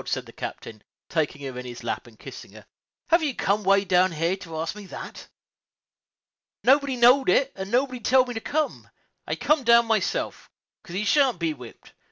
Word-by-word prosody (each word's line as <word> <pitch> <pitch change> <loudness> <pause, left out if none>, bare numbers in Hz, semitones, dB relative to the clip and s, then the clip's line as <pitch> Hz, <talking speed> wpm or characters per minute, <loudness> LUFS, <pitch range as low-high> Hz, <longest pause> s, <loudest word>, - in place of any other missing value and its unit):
said - - -2
the - - -13
captain, 110 -2 -8 0.3
taking 150 -3 -2
her 130 -2 -6
in - - -6
his 120 -1 -9
lap 120 - -4
and 115 -2 -17
kissing - - -11
her, - - -14 0.4
"have 335 0 +4
you 290 -5 -1
come 205 +2 0
way 195 +1 +3
down 185 0 +3
here 165 +3 0
to 165 -4 -9
ask 160 +1 -3
me 210 -2 -10
that?" - - -9 1.4
"Nobody 275 0 +3
knowed 250 +3 +5
it, 275 0 +3
and 195 0 -6
nobody 250 +2 0
telled 255 +2 +3
me 245 - -5
to 225 - -3
come; 305 +4 -2 0.4
I - - -1
comed 300 -5 +1
my 235 - +8 0.2
own - - -2
self, - - -3 0.3
'cause 170 - -10
he 200 - -1
shan't 265 0 +3
be 165 -2 -1
whipped. 125 -5 -14
200 Hz, 200 wpm, -25 LUFS, 165-255 Hz, 1.4 s, my